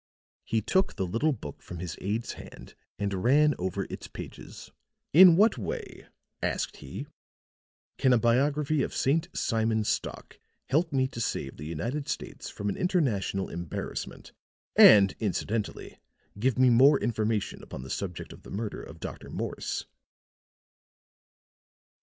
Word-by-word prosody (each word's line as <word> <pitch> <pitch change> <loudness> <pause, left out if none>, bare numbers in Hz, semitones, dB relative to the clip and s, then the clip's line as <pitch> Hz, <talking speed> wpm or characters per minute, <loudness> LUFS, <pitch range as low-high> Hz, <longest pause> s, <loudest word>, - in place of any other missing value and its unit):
He 110 - 0
took 190 0 +1
the 95 - -1
little 115 - +1
book 80 - -7
from 90 - -8
his 85 -2 -5
aide's 105 +4 -2
hand - - -12 0.2
and 100 -2 -2
ran 150 +5 +5
over 90 0 -2
its - - -7
pages. - - -10 0.4
"In 175 +1 +9
what 210 - +4
way," 100 - -6 0.3
asked - - -2
he, - - -7 0.9
"can 130 -1 +4
a 125 - +6
biography 140 +5 +2
of - - -2
St. 160 +6 +1
Simon 110 -2 +1
Stock 105 0 -3 0.3
help 160 +5 +2
me 130 -2 +2
to 115 - -6
save 70 -10 -3
the 75 - -7
United 120 - -3
States - - -5
from 100 - -5
an 100 - -1
international 130 - 0
embarrassment 85 -1 -6 0.4
and 100 -2 +8
incidentally 105 +1 -3 0.4
give 130 +3 +1
me 130 -1 +5
more 135 +4 +6
information 110 -2 -1
upon 65 - -8
the 65 - -8
subject 90 -4 -4
of - - -15
the - - -13
murder 105 +1 -4
of - - -11
Dr. - - -7
Morse?" - - -4
115 Hz, 140 wpm, -28 LUFS, 100-140 Hz, 0.9 s, In